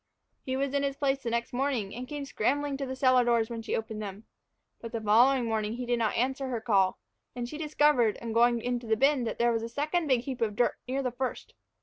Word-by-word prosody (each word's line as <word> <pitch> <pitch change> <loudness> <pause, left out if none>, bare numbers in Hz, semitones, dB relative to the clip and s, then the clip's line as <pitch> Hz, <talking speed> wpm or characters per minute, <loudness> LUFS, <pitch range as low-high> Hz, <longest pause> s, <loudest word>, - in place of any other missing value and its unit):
He 260 0 -3
was 275 0 -1
in 280 - +1
his 280 -1 -1
place 275 -1 0
next 235 +1 -2
morning, 245 -6 -1
and 250 +2 -6
came 290 0 -5
scrambling 280 +3 0
to 275 -1 -4
the 260 - -4
cellar 255 -1 +4
doors 235 -1 +1
when 230 -1 -4
she 225 - -2
opened 220 -1 -4
them. 205 +1 -7 0.5
But 230 0 -8
the 230 - -1
following 240 +4 +4
morning 220 -1 -1
he 245 +1 -4
did 240 0 0
not 220 -3 0
answer 265 +2 0
her 245 -3 -2
call, 200 -5 +2 0.4
and 240 -1 -3
she 300 +5 -7
discovered, 295 -7 +3
on 230 -1 -5
going 235 0 +4
into 245 0 -3
the 220 0 +2
bin, 275 0 +3
that - - -3
there 235 0 +3
was 225 -1 0
a 230 - -5
second 305 +6 -1
big 255 -4 +3
heap 255 -1 -6
of 215 -3 0
dirt 240 - +1
near 270 +2 -1
the 250 - -1
first. 255 +1 -4
245 Hz, 245 wpm, -29 LUFS, 230-270 Hz, 0.5 s, cellar